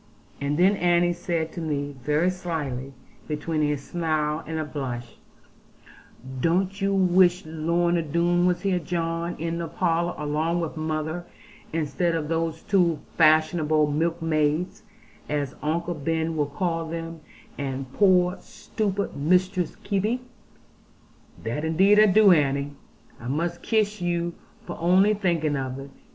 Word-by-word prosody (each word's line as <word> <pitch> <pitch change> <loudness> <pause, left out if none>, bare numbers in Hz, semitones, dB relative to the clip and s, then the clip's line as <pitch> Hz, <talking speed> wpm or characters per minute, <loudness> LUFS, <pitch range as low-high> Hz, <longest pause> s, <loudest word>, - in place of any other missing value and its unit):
And 145 +1 -1
then 190 +4 +4
Annie 175 -1 +3
said 170 -2 -2
to 170 - -6
me 145 -2 -3
very 150 +6 +2
slyly, 150 -8 -4 0.3
between 155 +1 -2
a 150 - 0
smile 155 0 -2
and 160 - -3
a 155 - -2
blush, 125 -5 -5 1.2
'Don't 185 - 0
you 195 0 +1
wish 185 -1 +4
Lorna 170 +2 +1
Doone 170 +3 +2
was 180 -1 +1
here, 190 -2 +1
John, 170 0 -2
in 165 +1 -3
the 170 - -3
parlour 170 0 0
along 155 +3 -1
with 165 -1 -3
mother; 155 +2 -3 0.4
instead 165 +2 0
of 155 -2 -3
those 165 -1 -1
two 175 -5 +2 0.2
fashionable 155 -1 +3
milkmaids, 160 +1 0 0.5
as 145 -2 -1
Uncle 170 +3 -1
Ben 160 +1 -1
will 150 -2 0
call 165 +2 -2
them, 165 0 -5 0.4
and 135 -1 -4
poor 185 -2 +3
stupid 205 -2 -3
Mistress 180 +3 +1
Kebby?' 215 +5 0 1.2
'That 120 +7 -3
indeed 190 +6 +4
I 215 - +7
do, 205 0 +6
Annie. 140 -3 +2 0.5
I 115 - -8
must 170 +6 -2
kiss 215 -2 0
you 175 -1 -1 0.3
for - - -7
only 185 +5 +4
thinking 170 -7 0
of 130 -1 -3
it. 135 0 -9
165 Hz, 135 wpm, -25 LUFS, 150-180 Hz, 1.2 s, I